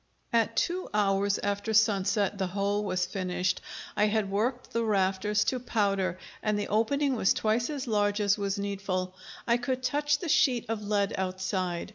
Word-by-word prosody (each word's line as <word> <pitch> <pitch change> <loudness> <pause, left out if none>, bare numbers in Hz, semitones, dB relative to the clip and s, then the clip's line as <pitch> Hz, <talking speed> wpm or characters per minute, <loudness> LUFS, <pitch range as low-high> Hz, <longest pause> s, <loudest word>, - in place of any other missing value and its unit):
At 230 0 +2
two 365 +2 0
hours 200 -1 +2
after 205 +2 -1
sunset 205 -1 +2
the 190 - 0
hole 200 +2 -1
was 185 -3 0
finished; 185 0 -1 0.3
I 210 - +3
had 210 -2 0
worked 240 +5 -1
the 230 - +1
rafters 205 0 +1
to 255 - 0
powder, 195 -6 0 0.2
and 215 -1 0
the 205 - -3
opening 265 +6 +1
was 195 - +3
twice 225 +4 +1
as 290 -3 -3
large 205 -2 +1
as 205 -1 +3
was 200 -1 -2
needful. 195 -2 -2 0.3
I 235 0 +3
could 255 +1 -2
touch 295 +2 +1
the 345 - -6
sheet 255 -5 +3
of 225 -2 -2
lead 205 -1 0
outside. 185 -1 -2
205 Hz, 170 wpm, -28 LUFS, 195-230 Hz, 0.3 s, I